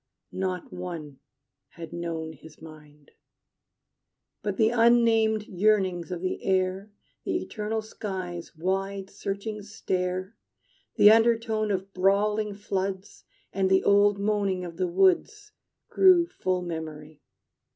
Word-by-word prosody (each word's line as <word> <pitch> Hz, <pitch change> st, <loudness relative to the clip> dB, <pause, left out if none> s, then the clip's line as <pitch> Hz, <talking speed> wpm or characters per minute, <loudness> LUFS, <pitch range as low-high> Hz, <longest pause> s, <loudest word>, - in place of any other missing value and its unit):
Not 185 Hz, -2 st, -4 dB
one 165 Hz, -6 st, -7 dB, 0.5 s
had 170 Hz, -1 st, -9 dB
known 165 Hz, -2 st, -4 dB
his 155 Hz, +1 st, -16 dB
mind. 150 Hz, -2 st, -15 dB, 1.3 s
But 200 Hz, -2 st, -3 dB
the 220 Hz, 0 st, +3 dB
unnamed 230 Hz, -2 st, +4 dB
yearnings 190 Hz, -3 st, +1 dB
of 175 Hz, -1 st, -4 dB
the 185 Hz, -, -3 dB
air, 190 Hz, +1 st, 0 dB, 0.3 s
The -, -, -1 dB
eternal 215 Hz, 0 st, -4 dB
sky's 185 Hz, -6 st, -6 dB
wide 195 Hz, +3 st, -2 dB
searching 205 Hz, +2 st, -5 dB
stare, 185 Hz, -1 st, -3 dB, 0.6 s
The 210 Hz, -2 st, +8 dB
undertone 225 Hz, -1 st, +2 dB
of 195 Hz, 0 st, -3 dB
brawling 205 Hz, +2 st, +1 dB
floods, 195 Hz, -1 st, -4 dB, 0.3 s
And 190 Hz, -1 st, +1 dB
the 190 Hz, 0 st, +3 dB
old 205 Hz, 0 st, +4 dB
moaning 200 Hz, -3 st, 0 dB
of 170 Hz, -1 st, -9 dB
the 185 Hz, -1 st, 0 dB
woods 385 Hz, -, +1 dB, 0.4 s
Grew 370 Hz, -3 st, +5 dB
full 185 Hz, -, -2 dB
of -, -, -6 dB
memory. 155 Hz, -2 st, -7 dB
195 Hz, 120 wpm, -26 LUFS, 180-215 Hz, 1.3 s, The